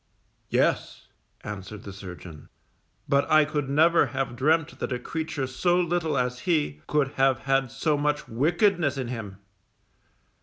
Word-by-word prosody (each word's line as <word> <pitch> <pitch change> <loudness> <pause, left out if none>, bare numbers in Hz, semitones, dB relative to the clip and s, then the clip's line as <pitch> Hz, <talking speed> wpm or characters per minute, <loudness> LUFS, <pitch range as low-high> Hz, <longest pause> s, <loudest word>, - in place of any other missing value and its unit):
Yes_, - - +1 0.4
answered 105 +1 -7
the 100 - -8
surgeon, 90 -5 -10 0.6
_but 140 0 +2
I 155 -1 +6
could 145 -2 -2
never 160 +2 +4
have 130 0 -3
dreamt 155 +5 +1
that - - -3
a 125 - 0
creature 155 +1 -3
so 175 +7 +1
little 170 -4 0
as 125 -1 -1
he, 145 - 0
could 150 -3 +1
have 135 -2 +2
had 135 -1 +1
so 150 +5 0
much 150 0 0
wickedness 160 - +1
in 130 -3 -3
him. 110 -6 -6
135 Hz, 145 wpm, -26 LUFS, 120-155 Hz, 0.6 s, I